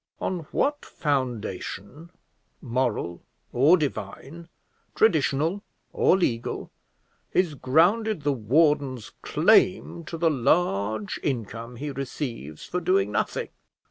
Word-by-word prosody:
On 175 Hz, -5 st, -3 dB
what 290 Hz, +1 st, 0 dB
foundation, 125 Hz, -, -3 dB, 0.5 s
moral 120 Hz, -, -2 dB, 0.3 s
or 145 Hz, +9 st, +6 dB
divine, 145 Hz, -, -5 dB, 0.5 s
traditional 160 Hz, -1 st, +2 dB, 0.3 s
or 185 Hz, -, +4 dB
legal, 120 Hz, -11 st, -2 dB, 0.6 s
is 180 Hz, -4 st, +2 dB
grounded 170 Hz, -, +2 dB
the 145 Hz, 0 st, +2 dB
warden's 135 Hz, 0 st, +1 dB
claim 180 Hz, 0 st, +3 dB
to 165 Hz, -, -6 dB
the 165 Hz, 0 st, +2 dB
large 110 Hz, -, +1 dB
income 115 Hz, -2 st, -4 dB
he 145 Hz, +4 st, -5 dB
receives 125 Hz, -, -5 dB
for 180 Hz, -, -2 dB
doing 390 Hz, +2 st, +2 dB
nothing? 485 Hz, -, -1 dB
145 Hz, 100 wpm, -26 LUFS, 115-170 Hz, 0.6 s, or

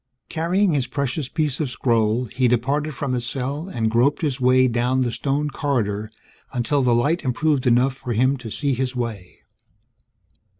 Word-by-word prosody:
Carrying 175 Hz, +4 st, +1 dB
his 135 Hz, -4 st, 0 dB
precious 140 Hz, +1 st, -2 dB
piece 150 Hz, -4 st, -1 dB
of 150 Hz, -4 st, -1 dB
scroll, 115 Hz, -1 st, +1 dB
he 125 Hz, +2 st, 0 dB
departed 140 Hz, +5 st, 0 dB
from 140 Hz, -3 st, -2 dB
his 125 Hz, -1 st, -1 dB
cell 135 Hz, +7 st, -4 dB
and 115 Hz, -10 st, -1 dB
groped 130 Hz, +8 st, +2 dB
his 140 Hz, -4 st, -1 dB
way 130 Hz, +1 st, +5 dB
down 125 Hz, +2 st, +1 dB
the 120 Hz, -2 st, 0 dB
stone 145 Hz, +4 st, -1 dB
corridor 110 Hz, -8 st, -1 dB, 0.4 s
until 135 Hz, +3 st, 0 dB
the 125 Hz, -2 st, +3 dB
light 150 Hz, +9 st, +1 dB
improved 135 Hz, +1 st, +1 dB
enough 125 Hz, +2 st, +3 dB
for 130 Hz, -2 st, -5 dB
him 130 Hz, +5 st, +2 dB
to 125 Hz, -3 st, -8 dB
see 140 Hz, +5 st, -1 dB
his 130 Hz, 0 st, -2 dB
way. 110 Hz, -7 st, -5 dB
130 Hz, 170 wpm, -22 LUFS, 120-145 Hz, 0.4 s, way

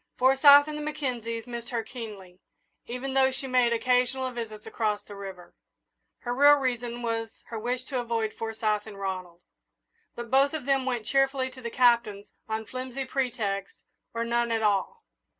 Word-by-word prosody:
Forsyth 280 Hz, +3 st, +7 dB
and 305 Hz, -, -4 dB
the 300 Hz, -, -4 dB
Mackenzies 245 Hz, -7 st, -3 dB
missed 235 Hz, -1 st, -7 dB
her 235 Hz, -2 st, -2 dB
keenly, 210 Hz, -7 st, -9 dB, 0.5 s
even 250 Hz, +3 st, -4 dB
though 265 Hz, 0 st, +4 dB
she 265 Hz, +1 st, -3 dB
made 250 Hz, -2 st, +3 dB
occasional 250 Hz, +2 st, +1 dB
visits 220 Hz, -3 st, -7 dB
across 210 Hz, -2 st, -1 dB
the 205 Hz, -, -11 dB
river. 190 Hz, -3 st, -9 dB, 0.7 s
Her 245 Hz, -, -2 dB
real 285 Hz, +3 st, +7 dB
reason 245 Hz, -3 st, -2 dB
was 225 Hz, -1 st, -1 dB, 0.2 s
her 225 Hz, -, -4 dB
wish 245 Hz, +3 st, -2 dB
to 260 Hz, -1 st, -3 dB
avoid 230 Hz, -2 st, -1 dB
Forsyth 220 Hz, -1 st, -2 dB
and 205 Hz, -2 st, -9 dB
Ronald; 185 Hz, -3 st, -5 dB, 0.7 s
but 235 Hz, -1 st, -7 dB
both 275 Hz, +3 st, +4 dB
of 305 Hz, -, -5 dB
them 270 Hz, -1 st, +1 dB
went 240 Hz, -4 st, -1 dB
cheerfully 270 Hz, -1 st, +1 dB
to 255 Hz, 0 st, -12 dB
the 235 Hz, -, -4 dB
Captain's 235 Hz, -5 st, +2 dB, 0.2 s
on 220 Hz, 0 st, -2 dB
flimsy 255 Hz, +2 st, -5 dB
pretexts 225 Hz, -7 st, -2 dB, 0.3 s
or 230 Hz, -, -3 dB
on 235 Hz, -, -2 dB
none 235 Hz, 0 st, +1 dB
at 225 Hz, -1 st, 0 dB
all. 215 Hz, -, 0 dB
240 Hz, 170 wpm, -27 LUFS, 220-260 Hz, 0.7 s, Forsyth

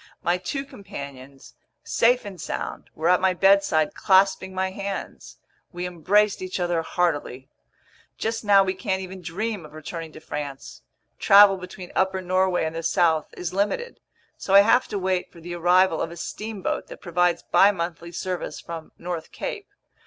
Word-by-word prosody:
My 175 Hz, +1 st, +1 dB
two 275 Hz, +10 st, -4 dB
companions, 140 Hz, -, -10 dB, 0.3 s
safe 245 Hz, 0 st, +2 dB
and 190 Hz, -5 st, -8 dB
sound, -, -, -5 dB
were 160 Hz, +2 st, -1 dB
at 180 Hz, +1 st, +4 dB
my 185 Hz, -1 st, +2 dB
bedside 195 Hz, -5 st, +3 dB
clasping 190 Hz, 0 st, +3 dB
my 190 Hz, 0 st, -2 dB
hands. 200 Hz, 0 st, -6 dB, 0.3 s
We 175 Hz, 0 st, -5 dB
embraced 190 Hz, +5 st, +2 dB
each 185 Hz, 0 st, -4 dB
other 175 Hz, -2 st, 0 dB
heartily. 145 Hz, -6 st, -2 dB, 0.7 s
Just 225 Hz, +1 st, -2 dB
now 200 Hz, -2 st, +6 dB
we 190 Hz, -1 st, -1 dB
can't 190 Hz, 0 st, -2 dB
even 185 Hz, 0 st, -9 dB
dream 195 Hz, +3 st, -3 dB
of 155 Hz, -, -13 dB
returning 160 Hz, +1 st, -7 dB
to -, -, -10 dB
France. 145 Hz, -3 st, -7 dB, 0.4 s
Travel 200 Hz, -1 st, +7 dB
between 180 Hz, 0 st, -9 dB
upper 190 Hz, 0 st, +1 dB
Norway 185 Hz, -1 st, +1 dB
and 160 Hz, +1 st, -4 dB
the 165 Hz, -, -3 dB
south 165 Hz, -1 st, +2 dB
is 180 Hz, -1 st, -4 dB
limited. 210 Hz, -, -1 dB, 0.4 s
So 195 Hz, -, +1 dB
I 200 Hz, -, +11 dB
have 225 Hz, +5 st, +3 dB
to 210 Hz, -, -3 dB
wait 185 Hz, -1 st, -1 dB
for 170 Hz, -, -15 dB
the 175 Hz, +1 st, -7 dB
arrival 175 Hz, 0 st, +3 dB
of -, -, -2 dB
a 170 Hz, -, -10 dB
steamboat 210 Hz, +3 st, -4 dB
that -, -, -10 dB
provides 175 Hz, 0 st, +1 dB
bimonthly 170 Hz, -3 st, +2 dB
service 180 Hz, +1 st, -4 dB
from 165 Hz, -1 st, -8 dB
North 170 Hz, -2 st, -5 dB
Cape. -, -, -5 dB
180 Hz, 165 wpm, -24 LUFS, 165-195 Hz, 0.7 s, I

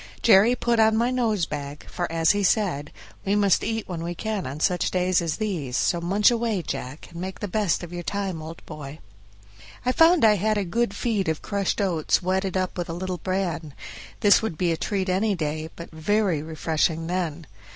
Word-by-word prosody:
Jerry 225 Hz, +2 st, +6 dB
put 235 Hz, -2 st, +1 dB
on 220 Hz, 0 st, +5 dB
my 240 Hz, +2 st, +2 dB
nose 225 Hz, -8 st, +1 dB
bag, 145 Hz, -1 st, -6 dB
for 175 Hz, -2 st, -4 dB
as 165 Hz, 0 st, +3 dB
he 205 Hz, -, 0 dB
said, 180 Hz, -, +1 dB, 0.3 s
"We 200 Hz, +1 st, +1 dB
must 200 Hz, -3 st, +3 dB
eat 225 Hz, -1 st, -2 dB
when 175 Hz, -3 st, -5 dB
we 170 Hz, +1 st, -4 dB
can 215 Hz, -1 st, -3 dB
on 140 Hz, +3 st, -6 dB
such 180 Hz, +2 st, +1 dB
days 185 Hz, -1 st, +2 dB
as 165 Hz, -2 st, -1 dB
these; 165 Hz, -, -2 dB
so 170 Hz, -, +1 dB
munch 200 Hz, +6 st, +3 dB
away, 230 Hz, -6 st, 0 dB
Jack, 130 Hz, +1 st, -6 dB
and 170 Hz, 0 st, -7 dB
make 190 Hz, +1 st, -5 dB
the 205 Hz, -, -3 dB
best 200 Hz, -3 st, 0 dB
of 175 Hz, 0 st, -8 dB
your 175 Hz, -, -4 dB
time, 190 Hz, -2 st, -3 dB
old 160 Hz, +1 st, -9 dB
boy." 145 Hz, 0 st, -8 dB, 0.9 s
I 250 Hz, -, +3 dB
found 325 Hz, 0 st, +5 dB
I 210 Hz, -1 st, +5 dB
had 215 Hz, +3 st, +1 dB
a 205 Hz, -, +1 dB
good 200 Hz, +3 st, -1 dB
feed 205 Hz, -6 st, 0 dB
of 160 Hz, -, -2 dB
crushed 200 Hz, -2 st, -1 dB
oats 175 Hz, -6 st, +1 dB
wetted 190 Hz, +1 st, -1 dB
up 185 Hz, -1 st, -2 dB
with 175 Hz, -, -3 dB
a -, -, -3 dB
little 180 Hz, +1 st, -4 dB
bran; 175 Hz, -6 st, -2 dB, 0.5 s
this 205 Hz, -1 st, +6 dB
would 220 Hz, -8 st, -3 dB
be 175 Hz, 0 st, +1 dB
a -, -, +1 dB
treat 195 Hz, +3 st, -2 dB
any 195 Hz, +3 st, +1 dB
day, 155 Hz, -1 st, -3 dB
but 170 Hz, -, -9 dB
very 175 Hz, 0 st, +1 dB
refreshing 160 Hz, +1 st, -1 dB
then. 170 Hz, -2 st, -3 dB
185 Hz, 205 wpm, -25 LUFS, 165-210 Hz, 0.9 s, Jerry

